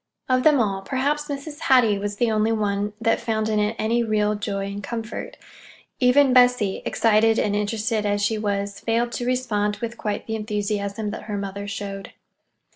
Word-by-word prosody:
Of 255 -1 +2
them 295 0 +5
all, 195 -4 0
perhaps 285 +7 -1
Mrs. 290 +1 -6
Hattie 230 -6 +4
was 205 0 -3
the 230 +2 +1
only 215 +1 +2
one 205 -1 -1
that 225 0 +1
found 220 -2 -1
in 215 -1 +1
it 210 +2 0
any 230 +2 +1
real 210 -2 +1
joy 200 -1 -3
and 200 +1 -5
comfort. 230 - -6 0.6
Even 260 +1 +5
Bessie, 245 -6 +4
excited 225 0 +3
and 205 -1 +1
interested 215 +1 -1
as 205 0 0
she 215 +2 0
was, 200 -1 -2
failed 235 +1 0
to 240 +1 -3
respond 210 -5 0
with 235 +2 -6
quite 210 -1 -3
the 220 - -3
enthusiasm 210 -1 -2
that - - -7
her 210 -2 -3
mother 200 0 -5
showed. 195 -1 -6
215 Hz, 180 wpm, -23 LUFS, 205-235 Hz, 0.6 s, them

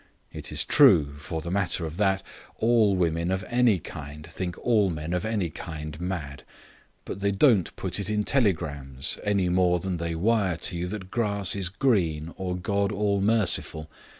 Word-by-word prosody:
It - - -6
is - - 0
true, 70 -2 +5
for 80 +3 -5
the 85 +2 -5
matter 95 -3 0
of 80 +1 -6
that, 95 -2 +1 0.3
all 110 -3 +3
women 85 -1 0
of 95 0 -1
any 120 -4 +3
kind 75 -2 -9
think 90 +1 -5
all 110 -5 +3
men 80 0 -4
of 90 +3 -1
any 105 -7 -1
kind 75 -1 -7
mad. 85 -7 -4 0.6
But - - -6
they 100 0 +1
don't 100 - +3
put - - -2
it 100 0 -3
in 105 -1 0
telegrams, 75 - 0
any 100 -3 +1
more 90 0 +3
than 95 0 -3
they 85 0 -3
wire 100 -1 +1
to 90 - -2
you 85 +1 -2
that 95 -1 -6
grass 100 -5 0
is 95 -3 -1
green 90 - 0
or 90 -1 -3
God 100 +2 0
all 100 -1 0
merciful. 100 -7 +1
95 Hz, 175 wpm, -26 LUFS, 85-100 Hz, 0.6 s, true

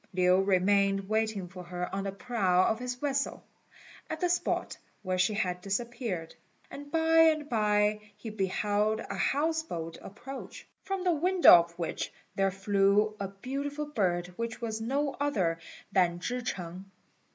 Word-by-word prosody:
Lin 185 +1 +3
remained 195 +1 +3
waiting 215 -3 -1
for 180 +1 -10
her 180 0 -4
on 195 0 -2
the 195 - -2
prow 190 -3 +1
of 220 - +1
his 250 0 -3
vessel, 275 +1 -2 0.7
at 315 - -4
the 355 - +1
spot 355 - 0 0.3
where 185 -1 -1
she 210 +3 +2
had 180 -3 -1
disappeared; 200 -4 -3 0.4
and 285 0 -9
by 325 0 +3
and 310 -2 +4
by, 210 -3 +2 0.2
he 215 +1 -7
beheld 210 +2 0
a - - -6
house 315 +3 +1
boat 165 - -6
approach, 265 +7 -9
from 390 -1 -3
the 360 -2 +3
window 360 +4 +6
of 170 -1 +5
which 170 -2 -3 0.2
there 195 0 +2
flew 200 +2 +2
a 200 - -2
beautiful 275 +9 -4
bird 185 -11 0
which 230 -1 -4
was 225 -2 -3
no 275 +5 -1
other 190 -13 0 0.3
than 175 -3 +2
Chih 250 +7 -3
ch'eng. 185 -5 -5
210 Hz, 155 wpm, -29 LUFS, 185-270 Hz, 0.7 s, window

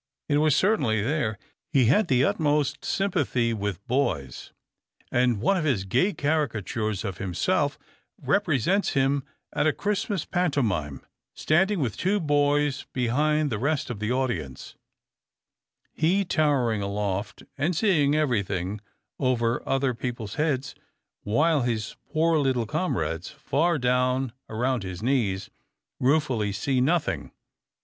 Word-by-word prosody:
It 145 - +2
was 155 -1 +3
certainly 140 - +2
there. 115 -5 -1 0.3
He 135 -5 +4
had 175 - +3
the 130 -3 +3
utmost 145 -1 +1
sympathy 145 -12 0
with 100 -3 -4
boys, 70 - -1 0.6
and 120 -3 +2
one 195 - +2
of 175 - -1
his 130 -11 +1
gay 180 - +2
caricatures 115 - -1
of 95 -3 -5
himself 95 -4 0 0.4
represents 180 - +1
him 135 +1 +2 0.3
at - - +1
a - - +4
Christmas 205 0 -2
pantomime 115 - -1 0.3
standing 190 +5 +2
with 115 -7 -2
two 200 +3 +1
boys 145 -2 +1
behind 145 +4 +1
the 105 - -2
rest 140 0 -1
of 110 - -6
the 105 +2 -2
audience, 125 - -3 1.2
he 185 +5 +2
towering 140 - +1
aloft 100 0 -3
and 155 +6 0
seeing 155 -7 +3
everything 100 - -1 0.4
over 120 -3 +1
other 135 -1 +1
people's 115 -3 -5
heads, 140 -4 -1 0.5
while 150 +8 +2
his 115 -3 -2 0.2
poor 160 +1 +2
little 130 -4 +1
comrades, 85 - -2
far 170 +3 0
down 125 -1 +1 0.2
about 120 +2 0
his 95 0 -6
knees, 110 -8 0 0.5
ruefully 130 -7 +1
see 130 +6 0
nothing. 165 +5 0
130 Hz, 125 wpm, -26 LUFS, 110-155 Hz, 1.2 s, He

